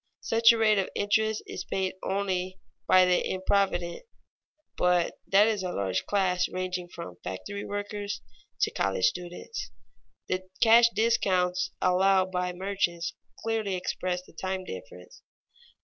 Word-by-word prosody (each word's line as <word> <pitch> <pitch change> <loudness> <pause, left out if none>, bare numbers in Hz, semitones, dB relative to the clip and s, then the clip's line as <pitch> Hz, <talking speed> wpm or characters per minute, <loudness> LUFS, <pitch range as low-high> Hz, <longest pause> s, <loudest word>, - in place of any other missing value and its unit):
Such 230 +1 +5
a 230 - +1
rate 215 -2 +4
of 190 - -1
interest 220 +1 +1
is - - -6
paid 190 -1 -2
only 190 -1 -2 0.3
by 185 0 +7
the 180 0 +2
improvident, 185 -2 0 0.7
but 180 -1 +1
that 200 +2 +6
is 215 -3 0
a 180 -1 -3
large 95 - -2
class 185 -3 +1
ranging 185 -1 -3
from 90 - -9
factory 95 - -5
workers 205 0 -4 0.4
to - - +3
college 95 -1 0
students. 180 - -3 0.6
The 185 0 -3
cash 230 +1 +7
discounts 185 -5 +2
allowed 185 +1 +3
by 180 0 -1
merchants 180 -2 -2 0.3
clearly 220 -4 -1
express 180 0 -2
the - - -19
time 190 0 -3
difference. 95 - -10
185 Hz, 135 wpm, -28 LUFS, 180-205 Hz, 0.7 s, by